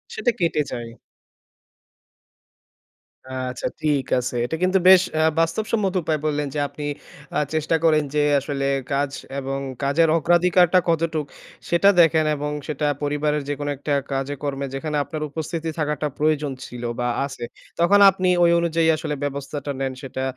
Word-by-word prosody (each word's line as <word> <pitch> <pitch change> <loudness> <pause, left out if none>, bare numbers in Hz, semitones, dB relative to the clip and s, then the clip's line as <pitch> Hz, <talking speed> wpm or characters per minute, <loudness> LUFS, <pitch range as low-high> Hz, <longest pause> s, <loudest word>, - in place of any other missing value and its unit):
সেটা 245 - +1
কেটে 165 -3 +1
যায়। 120 -2 -5 2.6
আচ্ছা, 125 - -4
ঠিক 145 -3 +1
আছে। 125 0 -4
এটা 160 - -3
কিন্তু 185 +1 +3
বেশ 190 -1 +9
অ্যা 155 - +2 0.2
বাস্তবসম্মত 195 +3 0
উপায়ে 155 -1 -1
বললেন 150 -1 0
যে, 150 - 0
আপনি 150 - -7 0.5
আ - - +3
চেষ্টা 160 +1 +1
করেন 155 -2 +4
যে 150 - +3 0.2
আসলে 140 0 -3 0.3
কাজ 140 0 +1 0.3
এবং 135 0 -3 0.2
কাজের 155 +4 +3
অগ্রাধিকারটা 175 +2 +4
কতটুক 160 -2 0 0.4
সেটা 175 +3 +5
দেখেন 160 -1 +4
এবং 150 0 -3 0.2
সেটা 150 0 -1 0.2
পরিবারের 145 0 0
যেকোনো 145 0 -3
একটা 145 +2 -2 0.2
কাজে 135 +1 -2
কর্মে, 140 -1 -2
যেখানে 150 +2 -3
আপনার 155 +1 -6
উপস্থিতি 160 +2 -4
থাকাটা 150 0 -1
প্রয়োজন 150 -2 +1
ছিল 120 0 -9 0.2
বা 120 - 0 0.2
আছে, 135 -3 -8 0.4
তখন 200 +4 +5
আপনি 185 -1 0
ওই 170 - +5
অনুযায়ী 165 -1 +1
আসলে 150 -1 -3
ব্যবস্থাটা 145 +1 -4
নেন, 135 -1 -2
সেটা 130 -1 -5
150 Hz, 145 wpm, -22 LUFS, 140-165 Hz, 2.6 s, বেশ